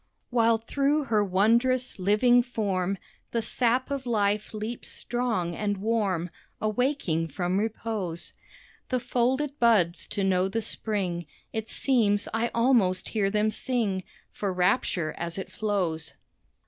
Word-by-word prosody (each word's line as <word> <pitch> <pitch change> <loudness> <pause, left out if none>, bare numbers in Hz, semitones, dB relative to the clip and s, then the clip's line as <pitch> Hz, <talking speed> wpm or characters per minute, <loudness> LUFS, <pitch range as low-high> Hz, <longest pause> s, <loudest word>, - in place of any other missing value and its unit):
While 230 -1 +4
through 280 +6 +1
her 220 -5 +2
wondrous, 235 +6 +2
living 215 +6 +4
form 200 -6 -1 0.3
The 230 - 0
sap 250 +4 +1
of 270 -2 -3
life 210 -2 +1
leaps 220 +2 -5
strong 230 -9 -2
and 205 +1 -1
warm, 195 -5 0 0.3
Awaking 215 - 0
from 180 +5 -1
repose 210 -5 -3 0.6
The 255 - +1
folded 265 +5 0
buds 200 -8 +3
to 200 - -2
know 185 -1 +2
the 225 +3 -2
Spring, 185 -7 -2 0.3
It 220 -1 -3
seems 215 -6 +2
I 225 +1 +1
almost 230 -7 +2
hear 205 -3 +1
them 210 +1 +1
sing 215 -5 -1 0.3
For 200 -2 -2
rapture 180 -2 +1
as 170 +1 -3
it 190 - -5
flows. 185 -7 -1
215 Hz, 130 wpm, -27 LUFS, 190-240 Hz, 0.6 s, While